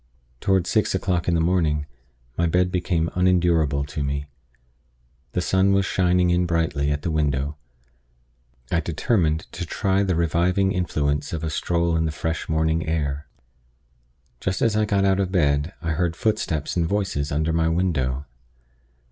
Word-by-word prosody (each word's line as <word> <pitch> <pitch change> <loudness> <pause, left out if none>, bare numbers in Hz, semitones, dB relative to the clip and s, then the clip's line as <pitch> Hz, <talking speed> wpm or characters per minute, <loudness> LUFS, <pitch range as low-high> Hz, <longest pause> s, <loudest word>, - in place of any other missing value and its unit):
Toward 95 +1 +2
six 110 -1 +1
o'clock 90 -2 -1
in 85 - +2
the - - +2
morning, 80 -3 +1 0.5
my 85 - +1
bed 90 +2 +2
became 90 -2 0
unendurable 85 -6 +2
to 75 +1 -5
me. 70 0 -2 1.1
The 90 - 0
sun 95 +2 +2
was 100 0 +2
shining 90 -2 +2
in 90 0 +2
brightly 80 -4 0
at 75 0 -2
the 85 - -1
window. 75 -2 0 1.2
I 85 - +2
determined 85 - 0
to - - -5
try 95 +3 0
the 95 -3 +1
reviving 85 +4 +2
influence 75 -6 -1
of 80 -1 -3
a 80 - -2
stroll 85 +1 0
in 80 0 +1
the 80 - -1
fresh 80 +1 -3
morning 80 +1 +1
air. 75 -2 -2 1.1
Just 95 0 -1
as 115 -2 +2
I 110 0 +2
got 100 -1 +1
out 95 0 +3
of 95 -2 0
bed, 75 -3 +1
I 80 - -1
heard 85 +1 0
footsteps 85 -9 -1
and 85 -2 +1
voices 95 -8 -1
under 80 +2 0
my 80 0 +2
window. 75 -6 0
85 Hz, 160 wpm, -23 LUFS, 75-90 Hz, 1.2 s, out